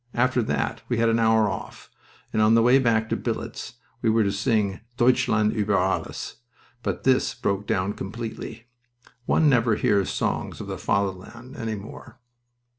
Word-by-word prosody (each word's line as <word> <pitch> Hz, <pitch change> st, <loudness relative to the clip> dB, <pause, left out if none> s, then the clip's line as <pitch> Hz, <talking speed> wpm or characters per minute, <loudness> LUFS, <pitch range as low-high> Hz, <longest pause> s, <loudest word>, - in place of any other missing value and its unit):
After 125 Hz, +1 st, +2 dB
that 110 Hz, -, -2 dB
we 120 Hz, -, 0 dB
had 115 Hz, 0 st, +3 dB
an 115 Hz, 0 st, +2 dB
hour 110 Hz, -1 st, +4 dB
off, 95 Hz, -3 st, -7 dB, 0.4 s
and 110 Hz, -, +2 dB
on 110 Hz, +1 st, +5 dB
the 115 Hz, -, +5 dB
way 125 Hz, +3 st, +6 dB
back 115 Hz, -3 st, +2 dB
to -, -, +1 dB
billets -, -, -5 dB, 0.3 s
we 115 Hz, -, +2 dB
were 110 Hz, 0 st, +3 dB
to 100 Hz, -, +1 dB
sing 105 Hz, -1 st, 0 dB, 0.2 s
'Deutschland 120 Hz, -3 st, +3 dB
uber 105 Hz, -2 st, +1 dB
Alles,' 95 Hz, +1 st, -2 dB, 0.4 s
but -, -, -3 dB
this 130 Hz, -1 st, +2 dB
broke 100 Hz, +1 st, -2 dB
down 95 Hz, +2 st, 0 dB
completely. 110 Hz, +2 st, -7 dB, 0.6 s
One 155 Hz, -, +3 dB
never 120 Hz, -5 st, +3 dB
hears 100 Hz, -2 st, +1 dB
songs -, -, -2 dB
of -, -, -6 dB
the -, -, -6 dB
Fatherland 100 Hz, +6 st, -3 dB
any 110 Hz, -1 st, -3 dB
more." 105 Hz, +4 st, -11 dB
110 Hz, 165 wpm, -25 LUFS, 100-120 Hz, 0.6 s, way